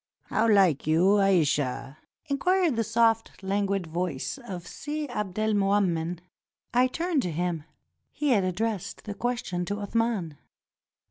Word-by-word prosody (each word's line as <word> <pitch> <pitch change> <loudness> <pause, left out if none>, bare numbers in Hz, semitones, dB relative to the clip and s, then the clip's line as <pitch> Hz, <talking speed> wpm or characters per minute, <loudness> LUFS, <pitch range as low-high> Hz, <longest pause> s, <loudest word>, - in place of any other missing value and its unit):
"How 225 +1 +2
like 190 -9 +4
you 180 +6 +4
Aisha?" 145 -7 +1 0.3
inquired 340 +1 +2
the 230 - +1
soft, 225 -1 +1
languid 195 -1 0
voice 175 - -3
of 185 -9 -7
Si 300 +8 -4
Abdelmoummen. 200 -5 0 0.6
I 250 +2 +5
turned 330 +2 0
to 180 - -3
him. 165 -1 -2 0.5
He 295 - -1
had 215 -7 +4
addressed 195 +2 -2
the 210 - -5
question 235 -6 -2
to 205 - -2
Athman. 205 -6 -1
200 Hz, 125 wpm, -27 LUFS, 175-230 Hz, 0.6 s, I